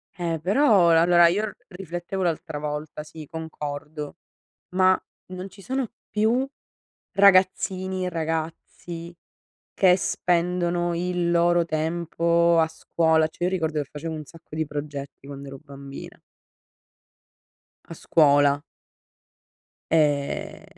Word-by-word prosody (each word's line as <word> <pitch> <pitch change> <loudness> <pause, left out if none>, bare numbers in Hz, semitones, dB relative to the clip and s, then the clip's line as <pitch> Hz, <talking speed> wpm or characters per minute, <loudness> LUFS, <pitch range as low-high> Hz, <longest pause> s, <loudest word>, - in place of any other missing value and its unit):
Eh 170 -2 -2
però 195 - +4
ehm, 165 - +6
allora 175 +1 +6
io 190 +5 +1
r 205 - -7
riflettevo 180 0 -5
l'altra 160 -3 -2
volta, 150 0 -5
sì 155 0 -10
concordo, 150 -2 -6 0.6
ma 185 0 +5 0.4
non 185 +1 -6
ci 195 - -15
sono 260 0 -2 0.2
più 230 +5 +1 0.7
ragazzini 190 -1 +3
e 180 - -1
ragazzi 165 +1 -5 0.6
che 185 -2 +5
spendono 175 -1 0
il 175 0 -1
loro 175 0 +3
tempo 170 +1 +1
a 160 - +2
scuola, 160 0 +1
cioè 160 +2 -6
io 180 - +2
ricordo 160 -5 -1
che 140 - -11
facevo 160 +2 -5
un 155 -1 -6
sacco 165 0 -14
di 160 0 0
progetti 145 -2 -7
quando 140 0 -8
ero 135 0 -9
bambina 140 0 -10 1.7
a - - -9
scuola. 145 -2 +3 1.3
Ehm 155 +6 +1
170 Hz, 120 wpm, -25 LUFS, 155-180 Hz, 1.7 s, ehm